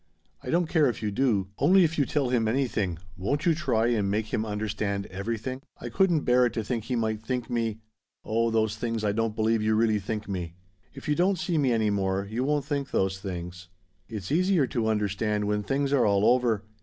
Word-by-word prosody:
I - - -7
don't 175 +3 +2
care 155 -4 +3
if 115 - -5
you 105 - -1
do, 105 -5 +1
only 185 +7 +5
if 165 -1 +1
you 140 - +2
tell 140 -5 0
him 120 -3 +1
anything, 110 - 0 0.2
won't 140 - -2
you 170 - +5
try 130 -8 +1
and 105 -5 +1
make 110 +2 -2
him 110 - 0
understand 105 -1 -2
everything? 115 +6 -4 0.2
I 120 - -6
couldn't 170 +4 +2
bear 125 -1 +4
it - - -6
to 110 - -2
think 115 0 -3
he 125 - -2
might 110 -2 -1
think 125 +2 -3
me 115 -2 -1 0.4
oh 115 +1 +1
those 110 -1 +1
things 115 0 -3
I 105 - +2
don't 115 0 -1
believe 110 0 +1
you 110 0 +2
really 110 -1 +2
think 105 +2 -4
me. 90 -4 -4 0.4
"If 135 - -9
you 150 - +3
don't 185 +4 +2
see 170 -1 0
me 135 -3 +2
any 110 -2 +2
more, 95 -1 0
you 115 +5 -2
won't 145 0 0
think 140 -2 -2
those 95 0 0
things. 90 -1 -6 0.4
It's 105 -1 -6
easier 180 -1 +3
to 120 -4 -1
understand 105 0 0
when 105 0 0
things 140 +6 -1
are 130 -6 +4
all 100 0 +3
over. 120 -4 +3
115 Hz, 215 wpm, -27 LUFS, 105-135 Hz, 0.4 s, only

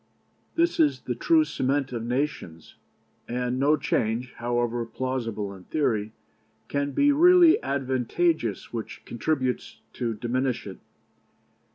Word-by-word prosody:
This 335 +1 +1
is 305 -2 +3
the - - -3
true 325 -2 +3
cement 135 - -1
of 120 -2 -3
nations, 120 - -3 0.5
and 125 +1 -2
no 145 +3 +4
change, 115 +1 -1
however 120 0 -1
plausible 115 -4 -3
in 95 -2 -13
theory, 115 -9 0 0.6
can 140 0 -1
be 285 0 +4
really 345 +2 +6
advantageous 135 - -1
which 115 -2 -6
contributes 130 +1 -2
to 115 -3 -2
diminish 120 +1 -1
it. 95 -3 -8
125 Hz, 115 wpm, -26 LUFS, 115-145 Hz, 0.6 s, really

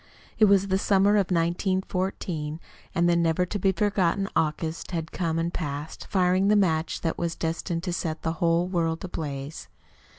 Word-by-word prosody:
It 215 - +7
was 200 -1 +4
the 190 0 +2
summer 200 0 +3
of 205 -3 +2
1914, 180 -2 -1 0.4
and 170 +1 +3
the 175 - +4
never 170 +1 +2
to 205 +3 -4
be 195 +1 +3
forgotten 195 0 +1
August 160 +1 -1
had 165 -2 -4
come 165 -3 -1
and 170 +1 -1
passed, 150 -1 -5
firing 185 0 +3
the 210 - +5
match 165 -5 +1
that 165 - -2
was 170 -1 -1
destined 165 +1 -2
to 180 -2 -2
set 160 -3 -3
the 160 - 0
whole 170 0 +3
world 165 -2 -1
ablaze. 145 -4 -5
170 Hz, 170 wpm, -26 LUFS, 165-190 Hz, 0.4 s, It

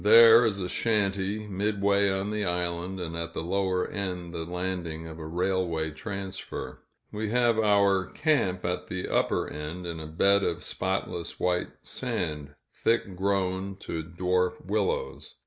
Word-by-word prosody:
There 115 +2 +9
is 100 -2 0
a 90 - -2
shanty, 100 0 0
midway 100 0 +2
on 95 +2 -1
the 105 0 -1
island, 90 +1 -2
and 85 -2 -4
at 85 0 -4
the - - -2
lower 95 +1 0
end 90 -3 -4
the 80 -1 -3
landing 90 -2 -3
of 80 0 -8
a 80 - -6
railway 85 -2 0
transfer. 95 - -6 0.3
We 105 0 -3
have 120 -1 +3
our 100 -3 +4
camp 140 - +1
at 90 +1 -2
the 90 0 -4
upper - - +1
end, 75 +4 -6
in 85 -1 -4
a 80 - -6
bed 100 +5 +3
of - - -1
spotless 85 - -2
white 90 -1 +1
sand, 80 - -3 0.2
thick 115 -4 0
grown 95 0 0
to 80 - -3
dwarf 90 +2 -1
willows. 480 +1 -2
95 Hz, 150 wpm, -28 LUFS, 85-100 Hz, 0.3 s, There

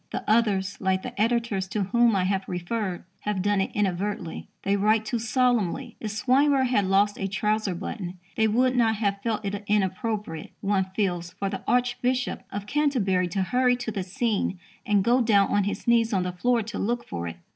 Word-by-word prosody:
The - - -5
others, 200 -3 +2
like 190 -1 +1
the 205 - -4
editors 230 -4 +1
to 205 +1 -1
whom 235 +3 +3
I 190 - +2
have 190 +1 0
referred, 180 +1 -3 0.2
have 205 -3 -2
done 205 -1 +2
it 190 - -1
inadvertently. 195 -2 -2 0.2
They 200 - +2
write 215 +2 +2
too 240 0 -1
solemnly. 240 0 0
If 215 - -4
Swinburne 265 +5 +3
had 225 -6 +1
lost 200 +2 +2
a 195 - -1
trouser 210 -1 0
button, 180 0 -5 0.2
they 220 -1 +3
would 250 +4 +2
not 225 -2 +3
have 200 -2 -1
felt 220 -1 -2
it 200 +1 -3
inappropriate, 205 -3 -1
one 195 -1 +1
feels, 175 -4 -1
for 195 -1 -3
the 195 - -4
Archbishop 250 +1 0
of 200 0 -4
Canterbury 210 -10 +1
to 190 +2 -1
hurry 250 +4 +2
to 245 -2 -4
the 200 - -3
scene 195 +1 -1 0.3
and 205 -2 +3
go 245 +4 +3
down 205 -4 +4
on 205 -1 +2
his 205 - -3
knees 230 -1 +3
on 190 -2 +2
the 180 - -2
floor 235 +5 +1
to 220 +2 -6
look 240 +3 -1
for 85 0 -4
it.... 85 0 -7
205 Hz, 195 wpm, -26 LUFS, 190-235 Hz, 0.3 s, down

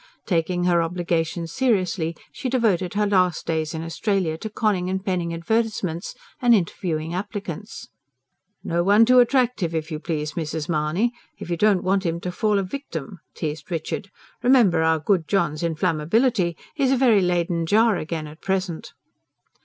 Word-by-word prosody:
Taking 175 -1 0
her 175 -1 +3
obligations 170 -1 -2
seriously, 185 -10 0 0.2
she 255 - -4
devoted 205 -8 +1
her 210 0 +2
last 185 -4 +2
days 160 -1 -1
in 160 - -4
Australia 175 0 -1
to 215 +7 -6
conning 205 -4 0
and 190 +1 -3
penning 180 -4 -1
advertisements, 185 -1 -2 0.3
and 240 -2 +6
interviewing 165 -4 -2
applicants. 200 +1 -6 0.8
"Now 170 - -2
no 175 - +3
one 205 +4 +6
too 250 +2 +6
attractive, 245 -9 +2
if 160 +1 -3
you 155 - -3
please, 150 -2 -3
Mrs. 160 -2 -3
Mahony! 165 +8 0 0.3
if 175 - -7
you - - +2
don't 200 +1 +3
want 195 +1 +1
him 170 -2 -1
to 180 - -3
fall 210 +3 +1
a 195 - +1
victim," 185 - -6 0.2
teased 150 0 -5
Richard. 170 +3 -4 0.3
"Remember 235 -10 +4
our 160 0 +3
good 160 +1 +1
John's 170 -6 0
inflammability. 170 - +1 0.2
He's 275 -3 +1
a 270 - +3
very 235 -6 +4
Leyden 175 -2 0
jar 220 +3 +4
again 160 -1 -4
at 150 +2 -12
present." 190 -3 -2
180 Hz, 160 wpm, -23 LUFS, 165-210 Hz, 0.8 s, and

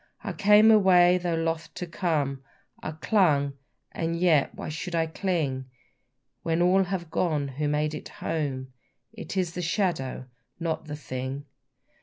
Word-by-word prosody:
I - - -3
came 210 +2 +6
away, 180 -4 +6
though 175 -2 -1
loth 165 0 -2
to 180 - -4
come, 155 -6 -1 0.4
I 155 - -4
clung, 155 -6 +2 0.4
and 165 0 -2
yet 165 -6 +3
why - - -6
should 160 +3 -4
I 165 -1 +2
cling? 160 -6 -2 0.8
When 165 0 0
all 185 +2 +4
have 175 -3 -4
gone 150 -5 0
who 145 +3 -2
made 150 +1 0
it 150 - -7
home, 130 -5 -3 0.4
It 220 -3 -7
is 180 -3 0
the 180 - -4
shadow, 165 -8 -1 0.3
not 165 -2 -2
the 150 -1 -5
thing. 130 0 -5
165 Hz, 150 wpm, -27 LUFS, 145-180 Hz, 0.8 s, came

